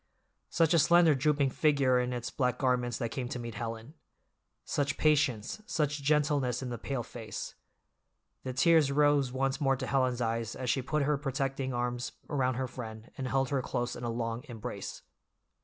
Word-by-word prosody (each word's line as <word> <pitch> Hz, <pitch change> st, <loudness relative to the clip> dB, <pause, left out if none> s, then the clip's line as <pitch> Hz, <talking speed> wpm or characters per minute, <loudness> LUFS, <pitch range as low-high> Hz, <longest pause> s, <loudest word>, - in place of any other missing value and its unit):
Such 165 Hz, 0 st, +3 dB
a 170 Hz, -, +5 dB
slender, 170 Hz, +1 st, +6 dB
drooping 140 Hz, 0 st, +2 dB
figure 140 Hz, -5 st, +3 dB
in 125 Hz, 0 st, -1 dB
its 120 Hz, -1 st, -4 dB
black 125 Hz, -2 st, 0 dB
garments 125 Hz, -3 st, +1 dB
that 115 Hz, -1 st, -3 dB
came 125 Hz, +1 st, -3 dB
to -, -, -3 dB
meet 120 Hz, -1 st, -6 dB
Helen! 115 Hz, +3 st, -6 dB, 0.7 s
Such 140 Hz, -1 st, -1 dB
patience, 145 Hz, -, +1 dB
such 150 Hz, -2 st, -1 dB
gentleness 140 Hz, -4 st, +1 dB
in 125 Hz, -, -4 dB
the 120 Hz, -, -4 dB
pale 135 Hz, -4 st, -3 dB
face! 110 Hz, -1 st, -7 dB, 0.9 s
The 130 Hz, -, -4 dB
tears 155 Hz, +2 st, +4 dB
rose 145 Hz, -2 st, +3 dB
once 135 Hz, +3 st, -1 dB
more 135 Hz, -1 st, +3 dB
to 130 Hz, 0 st, -4 dB
Helen's 130 Hz, -3 st, +1 dB
eyes 115 Hz, -1 st, -1 dB
as 125 Hz, -2 st, -1 dB
she 135 Hz, -, 0 dB
put 150 Hz, +3 st, 0 dB
her 145 Hz, 0 st, +1 dB
protecting 135 Hz, -1 st, -2 dB
arms 120 Hz, 0 st, -2 dB, 0.2 s
around 130 Hz, -3 st, +1 dB
her 130 Hz, +1 st, -2 dB
friend 115 Hz, -2 st, -8 dB
and 130 Hz, -2 st, -4 dB
held 135 Hz, -1 st, +1 dB
her 140 Hz, -2 st, 0 dB
close 120 Hz, -1 st, -2 dB
in -, -, -8 dB
a 120 Hz, -, -1 dB
long 115 Hz, 0 st, -3 dB
embrace. 115 Hz, -3 st, -6 dB
130 Hz, 180 wpm, -30 LUFS, 120-145 Hz, 0.9 s, slender